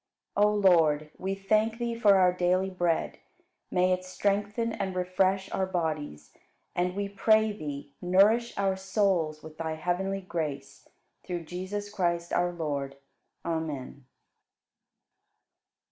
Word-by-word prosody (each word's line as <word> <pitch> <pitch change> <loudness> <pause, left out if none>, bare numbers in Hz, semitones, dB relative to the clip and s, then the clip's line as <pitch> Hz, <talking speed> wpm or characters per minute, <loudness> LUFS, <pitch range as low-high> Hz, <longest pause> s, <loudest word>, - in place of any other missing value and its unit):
60. 205 +1 +5
O 210 - +1
Lord, 160 -6 +4
we 195 +1 -2
thank 215 +3 +1
Thee 235 -1 -2
for 215 -4 +5
our 185 -1 +5
daily 185 +1 +1
bread. 175 -3 -1 0.5
May 185 0 +3
it 185 0 -2
strengthen 205 +4 -1
and 195 -3 -3
refresh 185 +1 +1
our 190 - 0
bodies! 155 - -3 0.4
And 180 +1 0
we 200 0 -1
pray 215 +2 +3
Thee, 145 -7 -7
nourish 205 +6 +3
our 195 -1 +1
souls 190 -6 0
with 155 0 -12
Thy 160 -1 -2
heavenly 190 +4 -1
grace, 150 -7 -5 0.4
through 175 -2 -4
Jesus 185 +5 -5
Christ, 170 -3 -1
our 175 0 +2
Lord. 140 -5 -3 0.5
Amen. 150 -5 -4
185 Hz, 130 wpm, -28 LUFS, 165-200 Hz, 0.5 s, 60